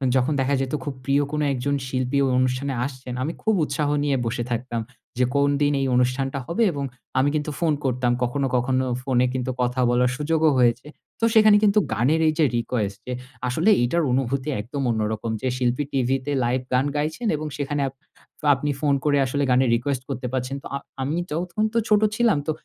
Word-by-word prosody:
যখন 130 Hz, +4 st, +2 dB
দেখা 135 Hz, +2 st, +1 dB
যেত, 135 Hz, +1 st, -3 dB
খুব 145 Hz, -, -4 dB
প্রিয় 140 Hz, +2 st, +2 dB
কোন 150 Hz, -, -1 dB
একজন 140 Hz, +3 st, -1 dB
শিল্পী 130 Hz, +1 st, -1 dB
ওই 130 Hz, -, +1 dB
অনুষ্ঠানে 130 Hz, +2 st, 0 dB
আসছেন, 130 Hz, -2 st, -7 dB
আমি 160 Hz, -, -2 dB
খুব 220 Hz, -, +2 dB
উৎসাহ 145 Hz, 0 st, -1 dB
নিয়ে 140 Hz, -2 st, +1 dB
বসে 120 Hz, +1 st, -2 dB
থাকতাম। 120 Hz, -1 st, -2 dB, 0.4 s
যে 125 Hz, -, +4 dB
কোন 140 Hz, 0 st, +3 dB
দিন 145 Hz, 0 st, +3 dB
এই 135 Hz, -, 0 dB
অনুষ্ঠানটা 130 Hz, +2 st, 0 dB
হবে? 200 Hz, +8 st, +1 dB
এবং 140 Hz, -3 st, -4 dB, 0.4 s
আমি 140 Hz, +2 st, +3 dB
কিন্তু 150 Hz, 0 st, -1 dB
ফোন 165 Hz, -3 st, +2 dB
করতাম। 125 Hz, -1 st, +1 dB
কখনো, 135 Hz, +3 st, 0 dB
কখনো 130 Hz, +1 st, +1 dB, 0.2 s
ফোনে 125 Hz, -2 st, +2 dB
কিন্তু 130 Hz, 0 st, -2 dB
কথা 125 Hz, +1 st, 0 dB
বলার 125 Hz, +1 st, +2 dB
সুযোগও 155 Hz, +1 st, +2 dB
হয়েছে। 120 Hz, +3 st, +2 dB, 0.3 s
তো 230 Hz, -, +2 dB
সেখানে 215 Hz, -2 st, +7 dB
কিন্তু 210 Hz, 0 st, +5 dB
গানের 135 Hz, +9 st, +2 dB
এই 155 Hz, -, +3 dB
যে 155 Hz, -, +5 dB
রিকোয়েস্ট, 105 Hz, -4 st, -2 dB
যে 125 Hz, -, -2 dB, 0.3 s
আসলে 160 Hz, -, +2 dB
এটার 165 Hz, +8 st, +1 dB
অনুভূতি 135 Hz, +2 st, 0 dB
একদম 135 Hz, +6 st, -5 dB
অন্যরকম। 110 Hz, 0 st, -2 dB
যে 130 Hz, -, -1 dB
শিল্পী 125 Hz, +2 st, 0 dB
টিভিতে 135 Hz, +1 st, 0 dB
লাইভ 125 Hz, +2 st, 0 dB
গান 130 Hz, +2 st, +3 dB
গাইছেন 155 Hz, +11 st, -2 dB
এবং 155 Hz, +1 st, -4 dB
সেখানে 145 Hz, 0 st, -2 dB
আপ 135 Hz, -, -7 dB, 0.6 s
আপনি 145 Hz, +2 st, -2 dB
ফোন 145 Hz, -2 st, +2 dB
করে 145 Hz, -1 st, +3 dB
আসলে 140 Hz, +2 st, -1 dB
গানের 125 Hz, 0 st, +3 dB
রিকোয়েস্ট 130 Hz, +2 st, -2 dB
করতে 125 Hz, -1 st, -3 dB
পারছেন। 130 Hz, +1 st, -2 dB
তো, -, -, -6 dB
আ -, -, 0 dB, 0.2 s
আমি 145 Hz, +5 st, -1 dB
তখন 175 Hz, +6 st, -2 dB
তো -, -, 0 dB
ছোট 210 Hz, 0 st, +5 dB
ছিলাম, 230 Hz, -9 st, +3 dB
তো 155 Hz, -, +2 dB
135 Hz, 195 wpm, -23 LUFS, 125-150 Hz, 0.6 s, সেখানে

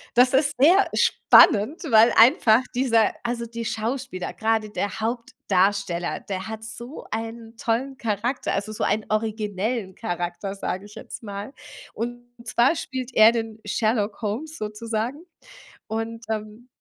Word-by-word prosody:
das 250 Hz, +2 st, +5 dB
ist 285 Hz, +2 st, +3 dB
sehr 360 Hz, +8 st, +5 dB
spannend, 225 Hz, -, +5 dB
weil 225 Hz, +2 st, +7 dB
einfach 230 Hz, -, +6 dB
dieser, 230 Hz, -4 st, +3 dB
also, 235 Hz, -1 st, -2 dB
die 235 Hz, 0 st, -6 dB
Schauspieler, 225 Hz, -3 st, -3 dB
grade 220 Hz, -1 st, 0 dB
der 205 Hz, 0 st, -3 dB
Hauptdarsteller, 200 Hz, -5 st, -1 dB
der 190 Hz, -1 st, -5 dB
hat 220 Hz, 0 st, -6 dB
so 235 Hz, +6 st, -9 dB
einen 225 Hz, +1 st, -5 dB
tollen 245 Hz, +4 st, -1 dB
Charakter, 230 Hz, +2 st, -2 dB
also, 200 Hz, +2 st, -3 dB
so -, -, -3 dB
einen 215 Hz, -, 0 dB
originellen 215 Hz, -1 st, -2 dB
Charakter, 175 Hz, -1 st, -4 dB
sage 195 Hz, 0 st, -4 dB
ich 210 Hz, -, -15 dB
jetzt -, -, -9 dB
mal. 205 Hz, +4 st, -7 dB, 0.4 s
Und 240 Hz, +1 st, -4 dB, 0.2 s
zwar 240 Hz, +7 st, +3 dB
spielt 260 Hz, -4 st, -5 dB
er 220 Hz, +1 st, +8 dB
den 225 Hz, -2 st, -4 dB
Sherlock 215 Hz, -1 st, 0 dB
Holmes 250 Hz, +10 st, -4 dB
sozusagen 225 Hz, +6 st, -4 dB, 0.6 s
und, 225 Hz, +1 st, -4 dB
ähm 215 Hz, +2 st, -5 dB
225 Hz, 135 wpm, -24 LUFS, 210-240 Hz, 0.6 s, er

